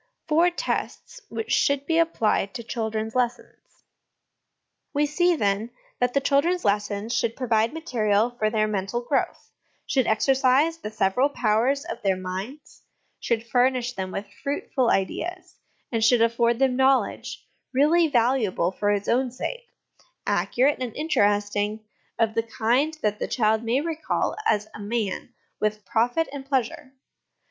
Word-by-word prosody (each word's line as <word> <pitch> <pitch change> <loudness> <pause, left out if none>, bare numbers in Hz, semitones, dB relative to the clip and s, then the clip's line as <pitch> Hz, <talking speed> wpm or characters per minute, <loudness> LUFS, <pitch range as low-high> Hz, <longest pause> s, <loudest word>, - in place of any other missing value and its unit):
Four 330 +3 +4
Tests 355 +7 -4
which 445 - -5
should 280 -1 +2
be 330 +1 +2
applied 220 -11 +1
to 235 - -5
Children's 220 -1 -3
Lessons. 245 -1 -4 1.1
We 295 +1 +3
see, 350 +4 +2
then, 205 -3 0 0.3
that 245 +1 0
the - - +5
children's 290 +6 +1
lessons 205 +2 0
should 230 0 0
provide 230 -3 +1
material 235 -8 0
for 220 -3 -1
their 215 -1 +1
mental 200 +3 -2
growth, 270 +3 -2 0.3
should 260 -4 +1
exercise 270 +7 +3
the 210 - -5
several 215 +7 +1
powers 255 +4 +1
of 345 - -6
their 195 -2 +2
minds, 190 +10 -7 0.4
should 230 -1 -1
furnish 245 0 +1
them 190 -3 -4
with 195 +2 -5 0.2
fruitful 275 -3 -1
ideas, 350 - -2 0.3
and 225 -2 0
should 230 0 +5
afford 235 0 +2
them 265 0 +2
knowledge, 265 +1 +1 0.2
really 310 +6 +4
valuable 235 - +1
for 205 +2 -1
its 205 -1 0
own 255 +2 +2
sake, 480 - -6 0.6
accurate, 265 +2 +1
and 245 -3 -4
interesting, 205 -6 0 0.3
of 225 -1 +1
the 230 - +1
kind 245 +7 0
that 210 0 0
the - - -2
child 220 -2 +1
may 235 +4 +1
recall 320 0 -2
as 210 0 +1
a - - -9
man 215 +2 -3 0.2
with 215 -1 -1
profit 245 +10 +1
and 270 -1 -7
pleasure. 260 -1 -2
240 Hz, 145 wpm, -25 LUFS, 215-280 Hz, 1.1 s, the